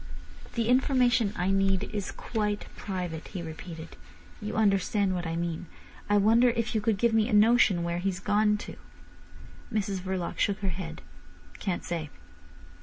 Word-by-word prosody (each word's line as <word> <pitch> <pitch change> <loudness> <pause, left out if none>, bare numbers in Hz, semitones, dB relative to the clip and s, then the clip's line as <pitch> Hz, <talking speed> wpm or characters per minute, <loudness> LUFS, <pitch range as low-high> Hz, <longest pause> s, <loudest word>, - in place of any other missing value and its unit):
"The 230 -2 0
information 250 -3 +3
I 180 +2 0
need 195 -1 +2
is 205 -3 -3
quite 210 -2 -2
private," 180 -5 -4
he 180 -4 -6
repeated. 165 0 -8 0.4
"You 210 +1 -4
understand 200 -1 +2
what 175 -2 -2
I 165 - -2
mean? 170 0 -3 0.4
I 205 - +4
wonder 225 +4 +5
if 230 0 -1
you 220 - +1
could 210 -1 +1
give 235 +2 +2
me 225 +1 +3
a - - -1
notion 210 -4 +5
where 170 0 -1
he's 185 0 -1
gone 210 +1 +2
to?" - - -9 0.9
Mrs 200 -3 -1
Verloc 185 -1 -3
shook 200 -1 +2
her 195 - 0
head. 165 -2 -6 0.6
"Can't 190 -4 -2
say." 165 -3 -3
195 Hz, 160 wpm, -28 LUFS, 180-215 Hz, 0.9 s, wonder